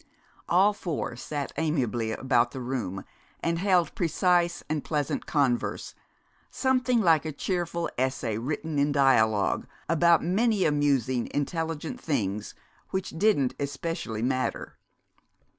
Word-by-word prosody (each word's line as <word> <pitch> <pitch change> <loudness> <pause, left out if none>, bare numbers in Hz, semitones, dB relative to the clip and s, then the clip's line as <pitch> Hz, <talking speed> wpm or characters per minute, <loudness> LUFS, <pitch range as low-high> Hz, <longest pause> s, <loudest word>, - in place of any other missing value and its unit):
All 195 +4 +5
four 170 -10 -4
sat 145 +3 -4
amiably 125 -8 0
about 120 0 +2
the 130 - -7
room 120 -7 -3 0.4
and 165 0 0
held 185 -3 +2
precise 175 -2 +1
and 155 -1 -2
pleasant 150 -3 -2
converse, 135 -5 0 0.6
something 255 -3 +1
like 165 -6 +4
a 155 - -3
cheerful 170 +2 -2
essay 130 -4 -1
written 150 +4 -3
in 145 +1 +2
dialogue, 110 -7 +3 0.2
about 170 0 +4
many 205 +3 +2
amusing, 140 -5 +1
intelligent 165 - -3
things 105 -9 -2 0.3
which 190 0 -2
didn't 160 -8 +2
especially 140 -5 -3
matter. 130 +1 -2
150 Hz, 115 wpm, -27 LUFS, 130-170 Hz, 0.6 s, All